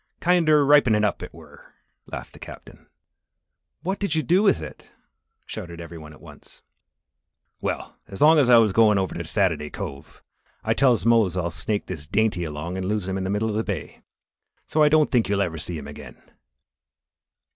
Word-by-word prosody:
Kinder 160 -4 +3
ripenin' 130 -7 +4
up, 105 - 0
it - - -8
were," - - -17 0.3
laughed - - -8
the - - -15
Captain. - - -13 1.0
"What 190 +3 -2
did 200 -6 -1
you 155 - 0
do 175 +10 +3
with 200 - +3
it?" 80 - -10 0.6
shouted 85 -1 -8
every 85 0 -9
one. 75 0 -12 1.5
"Well, - - -4
as 95 - -10
long 155 +1 +6
as 130 -4 +3
I 120 - +8
wuz 115 -2 +5
goin' 110 -1 +4
over 95 -1 -1
to 85 - -5
Sat'aday 85 -4 -1
Cove, 70 0 -8 0.4
I - - +1
tells 125 -5 +2
Mose 115 -6 +3
I'll 85 -1 -2
snake 105 +6 -3
this 75 -5 -7
dainty 105 -2 0
along 80 +3 -5
and 95 0 -3
lose 105 -2 -2
him 95 - -2
in 95 -1 -3
the - - -3
middle 105 +3 -1
of 105 - -3
the 110 - 0
bay. 95 -10 -6 0.6
So, 155 - 0
I 150 - +6
don't 155 0 +3
think 120 -5 +2
you'll 100 -1 +1
ever 85 -5 -2
see 85 +2 -5
him 70 -2 -8
agin." 75 - -11
105 Hz, 185 wpm, -23 LUFS, 85-125 Hz, 1.5 s, I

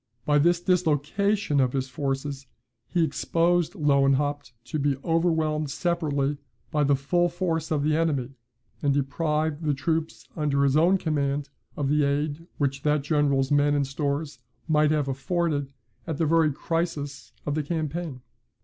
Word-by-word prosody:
By 145 0 +3
this 170 +3 +3
dislocation 175 +1 +1
of 130 -2 +2
his 135 -1 -1
forces 135 0 -3 0.4
he 175 -2 +2
exposed 170 +3 +1
Lewenhaupt 145 -1 +2
to 155 - -4
be 140 -1 +1
overwhelmed 160 -3 +1
separately 145 -4 -1 0.3
by 150 -2 +2
the 140 0 +4
full 175 +6 +1
force 165 -2 -2
of 150 -3 0
the 150 +1 +2
enemy, 145 -6 0 0.5
and 140 -2 +2
deprived 150 +2 0
the 150 -3 0
troops 160 +3 -2
under 145 -3 +1
his 140 0 +3
own 175 +5 +5
command 145 -4 -1 0.3
of 145 - 0
the 150 +1 +2
aid 145 +3 -1
which 140 -1 -1
that 150 -1 +1
general's 140 -2 +1
men 145 0 +3
and 140 -1 +1
stores 140 +1 -3 0.3
might 150 -1 +3
have 150 -2 +1
afforded, 145 +1 -1 0.4
at 160 -4 -2
the 165 - +1
very 160 0 +3
crisis 155 -2 -3
of 145 - -1
the 155 - 0
campaign. 155 -3 -4
150 Hz, 150 wpm, -26 LUFS, 140-165 Hz, 0.5 s, own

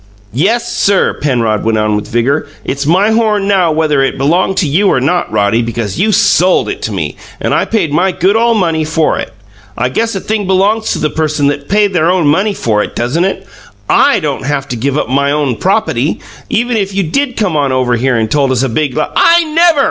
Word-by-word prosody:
"YES, 225 - 0
sir!" 200 -1 +2
Penrod 115 -7 -1
went 115 0 0
on 105 0 0
with 105 - -3
vigour. 130 +6 0 0.2
"It's 140 +1 -3
my 190 +7 +3
horn 215 -3 +1
now 185 -5 +2
whether 155 -2 +1
it 135 - -1
belonged 170 +7 +1
to 170 - +1
you 180 +9 +2
or - - +2
not, 165 +7 -1
Roddy, 105 +2 +1
because 115 - -4
you 215 +3 +2
SOLD 185 -1 +2
it - - -5
to - - -3
me - - -4 0.2
and - - -1
I - - +1
paid 165 -10 -1
my 185 +5 +2
good 185 +3 +1
ole 230 +1 +2
money 165 -6 0
for 155 0 0
it. - - -5 0.5
I 125 +1 0
guess 225 - -1
a - - -2
thing 210 0 -3
belongs 200 +4 +1
to - - -3
th`, - - -10
person 155 -2 0
that 145 0 -5
paid 205 -1 +2
their 170 -1 +2
own 180 -3 +1
money 190 +8 +1
for 105 - 0
it, - - -5
doesn't 135 +10 0
it? 195 - -3 0.4
I 280 - +3
don't 150 -5 -3
haf 140 -1 -2
to 125 - -3
give 135 +5 -2
up - - -1
my 140 +2 0
own 145 -5 -1
propaty, - - 0 0.3
even 240 +1 0
if 195 -2 -2
you 195 - +1
did 250 - -2
come 205 -7 0
on 140 -3 +1
over 130 -1 +1
here 125 +2 0
and 110 -1 -1
told 140 -3 +1
us 130 0 0
a 135 - 0
big 140 +1 -2
l - - 0
" - - -20
"I 340 0 +4
NEVER!" 325 0 +2
155 Hz, 230 wpm, -12 LUFS, 130-200 Hz, 0.5 s, I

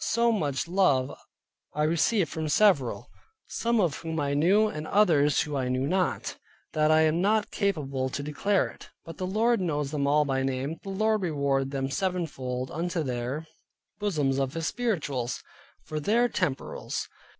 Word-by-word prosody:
So 235 +1 +2
much 150 -9 -1
love 155 -8 +2 0.6
I 150 - +1
received 170 +4 +2
from 160 -1 -3
several 150 - +3 0.4
(some 235 0 0
of 170 -8 +1
whom 160 -1 -4
I 140 -1 0
knew, 190 +9 +4
and 155 -6 -5
others 155 -9 +3
I 140 -4 -2
knew 130 +1 0
not) 180 +4 -1 0.4
that 155 0 +2
I 155 0 +5
am 160 +2 +2
not 210 +2 +2
capable 140 -10 -1
to 140 +2 -4
declare 190 +7 +1
it. - - -14 0.2
But 165 -1 -9
the 185 - -3
Lord 225 +3 +2
knows 150 -5 -1
them 145 -2 0
all 150 +1 +3
by 135 -1 0
name. 135 +4 -2
The 195 - -8
Lord 215 +2 +1
reward 140 -5 0
them 135 -1 -2
sevenfold 135 -7 -2
into 170 0 -2
their 130 +4 -3 0.5
bosoms 150 -10 0
of 135 +1 -1
His 165 -1 -2
spirituals, 145 - -2 0.4
for 155 - -4
their 230 +10 +3
temporals. - - -3
155 Hz, 160 wpm, -27 LUFS, 140-195 Hz, 0.6 s, I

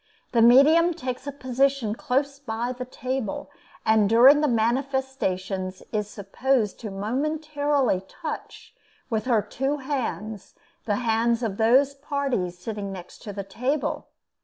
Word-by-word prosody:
The 235 - +3
medium 305 +8 +6
takes 255 -3 -5
a - - -2
position 265 -3 0
close 275 +4 -1
by 240 -1 -3
the 250 0 -6
table, 255 -3 -4 0.3
and 220 -2 +4
during 260 +6 +7
the 300 - +3
manifestations 230 -7 -1
is 210 -2 -2
supposed 215 +3 -1
to 220 - -5
momentarily 285 +2 0
touch 320 -3 -7 0.4
with 220 -1 0
her 230 -5 +2
two 270 +3 -2
hands 245 -7 -4 0.3
the 210 - +1
hands 230 +1 +2
of 205 -4 -2
those 260 +5 +4
parties 275 - -2
sitting 200 +1 -5
next 180 -2 -9
to 210 - -6
the 200 0 -5
table. 250 +9 -2
245 Hz, 135 wpm, -25 LUFS, 215-275 Hz, 0.4 s, during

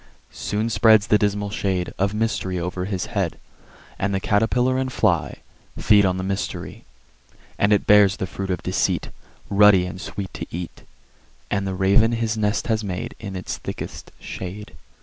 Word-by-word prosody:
Soon 105 +2 -2
spreads 110 -1 +5
the 105 -2 +3
dismal 105 0 0
shade 95 -3 -2
Of 100 +2 +1
Mystery 105 -4 -1
over 90 +1 -3
his 95 -2 -2
head; - - -1 0.6
And 100 0 0
the - - +1
Catterpiller 125 +6 +1
and 130 0 -2
Fly 95 -10 0 0.4
Feed 105 -2 +5
on 90 0 0
the 95 - -3
Mystery. 95 +1 -4 0.7
And 100 - +3
it 105 - +3
bears 100 -1 +6
the - - -2
fruit 95 +1 -6
of 90 -3 -2
Deceit, - - 0 0.4
Ruddy 100 -2 +5
and 90 +1 -7
sweet 100 -2 -6
to - - -6
eat; 85 0 -7 0.7
And 100 -1 0
the 95 - -2
Raven 100 +5 +3
his 115 -1 -1
nest 105 0 0
has 110 -2 0
made 90 -3 -4
In 100 -3 -6
its 95 - -5
thickest - - -7
shade. 100 +3 -7
100 Hz, 170 wpm, -23 LUFS, 95-105 Hz, 0.7 s, bears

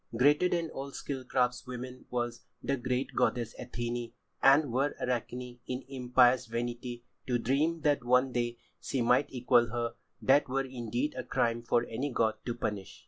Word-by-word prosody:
Greater 145 +8 +5
than 170 -2 -1
all 135 +1 -5
skilled 135 -2 -5
craftswomen 125 0 -2
was 120 -1 -2 0.2
the 140 - +1
great 125 +1 -2
goddess 120 -2 +1
Athené, 120 -1 -4 0.3
and 140 0 +6
were 135 +3 +1
Arachne, 125 0 -3
in 130 +1 -3
impious 125 -2 +3
vanity, 120 +1 -4 0.2
to 125 -2 +2
dream 150 +7 +1
that 145 -4 +2
one 125 +2 +3
day 120 -1 -1 0.2
she 135 - -2
might 125 +4 +3
equal 125 -1 +3
her, 120 0 -2 0.3
that 135 +1 +4
were 135 +1 0
indeed 125 +2 -2
a 130 - -3
crime 115 0 0
for 120 0 +1
any 135 +5 -3
god 110 -2 +2
to 120 - -1
punish. 105 -4 -4
125 Hz, 160 wpm, -31 LUFS, 120-135 Hz, 0.3 s, and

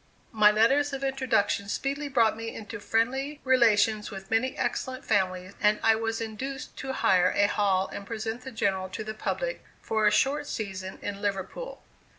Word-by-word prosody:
My 215 -2 +6
letters 270 +7 +3
of 275 0 -4
introduction 245 -7 0
speedily 280 +6 -2
brought 230 -5 +3
me 225 0 -6
into 220 +1 -7
friendly 255 +8 0
relations 220 -4 +3
with 195 -2 -9
many 255 +4 +1
excellent 260 +1 -2
families 185 -2 0
and 210 0 +3
I 225 - +6
was 225 0 -2
induced 260 +6 -5
to 265 - -4
hire 180 -7 +3
a 205 - +4
hall 195 -2 +1
and - - -7
present 225 +2 -4
the 260 - -7
General 190 -5 -1
to 185 +4 -5
the 215 0 -5
public, - - -3 0.2
for 220 -1 +1
a - - +5
short 280 +6 +1
season, 190 -3 -5
in 200 0 -4
Liverpool. 205 - -4
220 Hz, 170 wpm, -27 LUFS, 205-260 Hz, 0.2 s, My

